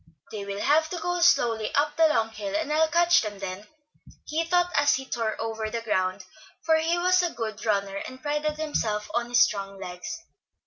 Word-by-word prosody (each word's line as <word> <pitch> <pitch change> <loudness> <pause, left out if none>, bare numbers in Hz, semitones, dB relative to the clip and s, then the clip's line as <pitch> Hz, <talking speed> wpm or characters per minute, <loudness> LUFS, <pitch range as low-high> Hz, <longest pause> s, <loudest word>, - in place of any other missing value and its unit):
"They 205 -2 -5
will 200 0 -5
have 315 +2 +3
to 355 - -4
go 355 +1 -2
slowly 230 -10 +3
up 295 +1 +1
the 325 -1 +5
long 225 -7 +1
hill, 295 +6 -5
and 310 -1 -1
I'll 320 +1 +4
catch 345 +2 +4
them 210 -2 -5
then," 195 +1 -6 0.6
he 315 +2 -1
thought 355 +1 +1
as 285 0 +4
he 265 - -5
tore 225 -3 -2
over 220 -1 -3
the 230 +1 -3
ground, 185 -3 -1 0.4
for 320 -1 +4
he 330 +2 +1
was 365 +1 +3
a 350 - 0
good 220 -6 -5
runner 200 -2 0
and 255 +5 -7
prided 300 +1 -1
himself 220 -9 -2
on 240 0 -1
his 240 0 +4
strong 195 -1 -3
legs. 180 - -6
240 Hz, 205 wpm, -26 LUFS, 210-320 Hz, 0.6 s, the